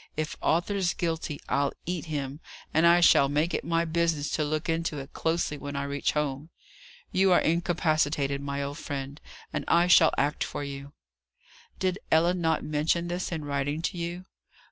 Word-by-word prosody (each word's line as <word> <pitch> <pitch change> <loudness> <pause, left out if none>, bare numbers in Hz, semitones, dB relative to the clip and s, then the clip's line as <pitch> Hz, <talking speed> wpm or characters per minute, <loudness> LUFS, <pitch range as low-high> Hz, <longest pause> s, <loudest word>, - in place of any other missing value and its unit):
"If 155 0 -2
Arthur's 175 +2 +1
guilty, 165 -3 -2
I'll 140 0 +1
eat 175 -2 -3
him; 145 -3 -4 0.3
and 160 +2 +5
I 175 +1 +6
shall 140 -4 +6
make 150 +4 0
it - - -1
my 165 0 +1
business 165 -2 0
to 155 - 0
look 155 +2 -2
into 165 -2 -1
it 135 +1 -8
closely 160 -3 -1
when 140 0 -6
I 140 - -1
reach 140 0 -1
home. 150 0 -2 0.6
You 190 0 +3
are 180 - +6
incapacitated, 155 -4 +1
my 140 0 -3
old 140 +1 -5
friend, 140 0 -5 0.3
and - - -2
I 170 +1 +4
shall 170 -3 +6
act 145 +2 +1
for - - -5
you." 140 0 -7 0.8
"Did 185 0 -1
Ellen 170 +3 +3
not 160 -1 +1
mention 155 +3 0
this, 180 +1 -3
in 160 -3 -4
writing 145 +2 -2
to 180 - -2
you?" 175 +2 -4
155 Hz, 175 wpm, -27 LUFS, 145-170 Hz, 0.8 s, I